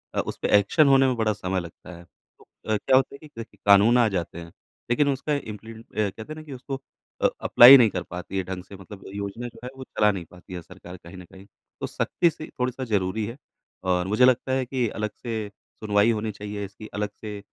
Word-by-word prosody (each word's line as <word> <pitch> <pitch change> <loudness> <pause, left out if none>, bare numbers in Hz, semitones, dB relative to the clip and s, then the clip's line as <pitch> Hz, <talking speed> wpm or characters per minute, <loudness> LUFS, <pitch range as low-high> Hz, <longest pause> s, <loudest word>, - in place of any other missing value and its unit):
अ, - - +1
उसपे - - -3
एक्शन 140 - +3
होने 135 -1 +5
में 130 - +1
बड़ा 110 -1 +1
समय 95 -2 -2
लगता 85 0 -10
है। 85 - -13
तो - - -28 0.3
अ, - - +2
क्या 130 - +2
होता 135 +1 +2
है - - -11
कि, 115 -6 -11
कानून 100 +4 +6
आ 120 -2 +5
जाते 85 -3 -4
हैं 85 -1 -10 0.4
लेकिन 130 +5 +2
उसका 140 +2 -1
इम्पली 110 -4 -7
अ 110 0 -13 0.3
कहते 110 +3 -9
हैं - - -10
ना, 155 - -9
कि 150 -3 -9
उसको 135 +1 -6 0.4
अ, - - +5
अप्लाई 125 +3 +10
नहीं 120 -4 +5
कर - - -4
पाती 90 +2 -7
है 95 - 0
ढँग 90 0 -6
से 100 - -12
मतलब 95 +1 -12
योजना 100 +4 -5
जो 120 - -13
है 125 - -5
वो 130 - -7
चला 105 -4 +2
नहीं 95 -4 -6
पाती 90 +1 -13
है 90 - -5
सरकार 90 +1 -12
कहीं 85 +2 -13
न 90 - -10
कहीं। 95 +1 -14 0.4
तो - - -2
सख़्ती 170 - +1
सी 155 -1 -9
थोड़ा-सा 125 +1 -2
ज़रूरी 105 -1 -1
है। 115 +4 -7 0.5
और 90 -1 0
मुझे 105 +6 +4
लगता 130 +1 +2
है 130 0 0
कि 125 -1 -1
अलग 110 0 -3
से 110 -3 -3 0.3
सुनवाई 105 +1 +3
होनी 110 -1 -2
चाहिए 105 0 -6
इसकी 100 +2 -11
अलग 105 0 -2
से 105 -2 -6
105 Hz, 235 wpm, -25 LUFS, 95-125 Hz, 0.5 s, अप्लाई